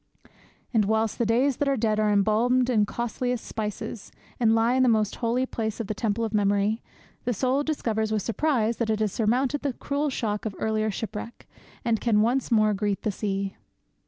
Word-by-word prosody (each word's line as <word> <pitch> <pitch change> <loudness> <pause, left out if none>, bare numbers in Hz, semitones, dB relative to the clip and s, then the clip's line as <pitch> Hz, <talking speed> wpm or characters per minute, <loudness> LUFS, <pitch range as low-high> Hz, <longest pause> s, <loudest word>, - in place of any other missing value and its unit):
And 220 -3 +3
whilst 220 +1 0
the 235 - +1
days 250 +4 +2
that 290 - 0
are 275 - +1
dead 215 -1 +1
are 215 -1 +2
embalmed 230 +5 +3
in 210 -3 +3
costliest 240 +1 -2
spices, 210 -1 -5 0.3
and 225 -2 +4
lie 225 +2 +3
in 260 - +3
the 255 - +5
most 215 -2 +1
holy 245 +2 0
place 220 -3 -3
of 230 - -2
the 215 - -3
temple 220 +1 -1
of 220 - -5
memory, 205 +1 +2 0.4
the 245 -1 -1
soul 260 +6 +1
discovers 225 -8 -1
with 215 -3 0
surprise 235 -3 0
that 230 -2 -1
it 215 -1 +1
has 215 -2 +1
surmounted 250 +7 +1
the 280 -3 -1
cruel 285 +4 -2
shock 210 -5 -2
of 200 - -6
earlier 220 0 0
shipwreck, 215 +2 -6 0.4
and 225 -2 +1
can 215 -3 +3
once 250 +4 +1
more 215 -3 +4
greet 200 0 -1
the 215 - 0
sea. 195 -1 -2
225 Hz, 195 wpm, -26 LUFS, 210-245 Hz, 0.4 s, the